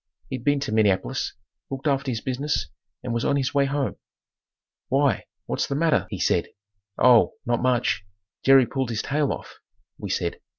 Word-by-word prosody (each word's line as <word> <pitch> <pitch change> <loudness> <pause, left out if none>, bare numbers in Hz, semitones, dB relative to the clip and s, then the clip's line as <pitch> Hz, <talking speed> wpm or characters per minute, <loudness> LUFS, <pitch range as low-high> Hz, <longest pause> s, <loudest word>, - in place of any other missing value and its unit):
He'd 130 -3 -4
been 145 +1 +2
to 140 - -3
Minneapolis, 110 +4 +1 0.4
looked 135 +1 -6
after 140 -2 +1
his 115 -3 -2
business 140 +3 -2 0.3
and 120 - -3
was 115 - -1
on 140 - +2
his 135 -2 -1
way 140 -1 +3
home. 140 0 -1 0.9
"Why, 140 0 +2 0.2
what's - - -1
the 140 - -2
matter?" 155 -8 +2
he 100 - -4
said. 85 - +1 0.5
"Oh, 120 -2 +6
not 120 0 0
much. 125 -4 +1 0.4
Jerry 135 -1 +7
pulled 130 0 -2
his 110 -2 -2
tail 145 0 0
off," - - -7 0.4
we - - -5
said. - - -2
130 Hz, 170 wpm, -24 LUFS, 120-140 Hz, 0.9 s, Jerry